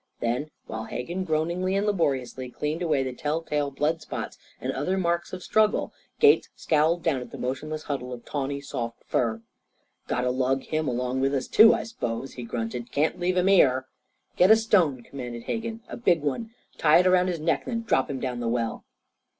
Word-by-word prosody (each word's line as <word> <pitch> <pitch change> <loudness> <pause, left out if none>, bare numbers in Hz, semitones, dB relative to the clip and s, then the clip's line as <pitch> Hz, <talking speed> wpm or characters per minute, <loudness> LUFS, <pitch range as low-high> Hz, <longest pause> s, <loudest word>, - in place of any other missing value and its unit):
Then, 125 +6 -1 0.2
while 110 0 -5
Hegan 175 +12 -4
groaningly 170 +4 0
and 200 +1 +1
laboriously 135 -10 -1
cleaned 150 +6 -3
away 155 -6 +1
the 130 -1 -4
tell 150 +5 -2
tale 145 -2 -1
blood 150 +4 -1
spots - - -6 0.2
and - - -3
other 165 +8 -1
marks 170 -2 0
of 185 -1 -6
struggle, 215 0 +2 0.3
Gates 435 -1 +5
scowled 160 +2 +2
down 140 -6 +1
at 125 - -8
the - - -9
motionless 150 +5 -4
huddle 130 -3 -4
of 120 -1 -8
tawny 140 -1 -3
soft 120 -5 -5
fur. 115 -2 0 0.6
"Got 125 - 0
to 125 0 +1
lug 130 +1 0
him 155 -1 -2
along 125 +1 -1
with 135 +1 +1
us, 130 - -2
too, 225 +1 +7
I - - -3
s'pose?" 135 - -4
he 125 - -7
grunted. 120 +1 -4
"Can't 150 +4 +1
leave 180 +1 0
him 180 - +3
here." 135 -10 +4 0.5
"Get 180 - +6
a 220 - +10
stone," 180 - +2
commanded 120 -3 -7
Hegan 225 - -4
"a - - -7
big 175 -10 +2
one. 150 - -2 0.3
Tie 150 -1 +6
it 180 - +4
around 185 0 +4
his 175 -3 -2
neck. 155 -2 0
Then 230 -2 -3
drop 135 -12 +1
him 135 -2 -3
down 125 -2 -3
the 120 - -2
well." 115 -1 -1
145 Hz, 200 wpm, -26 LUFS, 125-180 Hz, 0.6 s, a